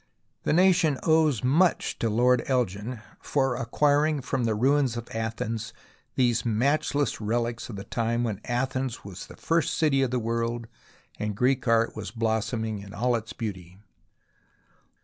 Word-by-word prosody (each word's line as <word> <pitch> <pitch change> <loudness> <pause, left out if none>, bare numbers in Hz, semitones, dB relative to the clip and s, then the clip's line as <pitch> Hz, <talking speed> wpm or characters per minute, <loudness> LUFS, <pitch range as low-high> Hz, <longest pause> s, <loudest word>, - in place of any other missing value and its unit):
The - - +2
nation 175 -4 +4
owes 155 -7 +3
much 160 +8 +2
to 115 - +1
Lord 125 +3 +3
Elgin 120 -2 -1 0.2
for 135 -3 0
acquiring 145 +4 +1
from 130 -2 -1
the 110 -1 +1
ruins 130 +1 +2
of 120 - -6
Athens 115 0 -3 0.4
these 120 -3 +2
matchless 140 +4 0
relics 115 +2 -2
of 110 - -6
the 100 - -6
time 115 +2 -1
when 110 -5 -3
Athens 130 -1 -2
was 95 -2 -8
the - - -13
first 165 0 +1
city 145 -4 +2
of 135 - +1
the 125 - 0
world 115 0 -2 0.5
and 105 -1 -3
Greek 130 +1 +1
art 115 0 +3
was 105 -2 -5
blooming 110 0 -1
in 100 0 -10
all 120 +3 +1
its 115 -1 -4
beauty. 95 -5 -6
120 Hz, 150 wpm, -26 LUFS, 110-135 Hz, 0.5 s, nation